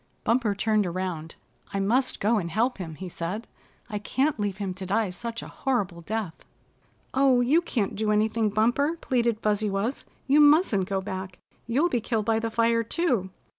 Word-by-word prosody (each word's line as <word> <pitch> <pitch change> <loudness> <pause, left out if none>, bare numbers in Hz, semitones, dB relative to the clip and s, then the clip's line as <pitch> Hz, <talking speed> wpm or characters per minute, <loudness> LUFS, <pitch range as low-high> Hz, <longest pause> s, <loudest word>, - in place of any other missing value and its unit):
Bumper 230 -3 +1
turned 210 -1 +1
around. 170 -3 -4 0.4
"I - - +1
must 240 +7 +1
go 220 +2 +2
and 170 -3 -4
help 230 +6 0
him," 165 -4 -6
he 185 +4 -7
said. 180 +6 -4 0.4
"I 210 -2 -4
can't 265 +5 0
leave 205 -2 -1
him 195 -3 -3
to 190 +1 -7
die 205 0 +1
such 230 +5 -5
a - - -8
horrible 200 -10 -2
death." 200 -2 -4 0.7
"Oh, 265 -2 +4
you 285 +8 +4
can't 230 - -2
do 215 +1 -1
anything, 215 +1 +2
Bumper," 240 +10 +1
pleaded 235 -3 0
Fuzzy 210 0 +1
Wuzz. 200 +7 -2 0.2
"You 285 +2 +4
mustn't 290 - +5
go 195 -1 0
back. 190 -1 -6 0.3
You'll 270 +9 +2
be 245 -9 0
killed 220 -2 -1
by 225 0 +2
the 225 0 -2
fire, 230 +1 +2
too." 230 - 0
215 Hz, 180 wpm, -26 LUFS, 195-240 Hz, 0.7 s, mustn't